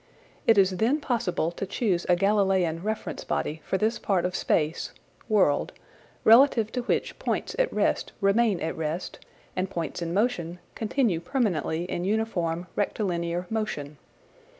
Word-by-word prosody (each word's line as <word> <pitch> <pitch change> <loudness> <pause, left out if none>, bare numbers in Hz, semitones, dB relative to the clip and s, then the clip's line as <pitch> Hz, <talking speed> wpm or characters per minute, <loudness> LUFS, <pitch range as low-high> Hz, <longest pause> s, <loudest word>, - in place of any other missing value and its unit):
It 225 - +6
is 190 -1 +4
then 245 +10 +2
possible 205 - -1
to 195 +3 -5
choose 185 -7 0
a 180 - +6
Galileian 190 -3 +2
reference 215 +1 -3
body 155 +1 -2
for 190 - -1
this 220 +3 0
part 190 -4 +1
of 180 0 -2
space 155 -2 0 0.4
(world), 190 -9 +2 0.5
relative 230 -2 +6
to 250 - -2
which 240 - -1
points - - -2
at - - +2
rest - - 0
remain 200 -1 +3
at 160 - -2
rest 160 +3 -4 0.4
and 185 0 -1
points 170 -2 -4
in 170 -1 -2
motion 180 -4 0 0.2
continue 220 -5 0
permanently 170 - -1
in 175 -1 -3
uniform 180 -5 -1
rectilinear 175 -4 -1
motion. 150 - -3
190 Hz, 145 wpm, -27 LUFS, 170-220 Hz, 0.5 s, It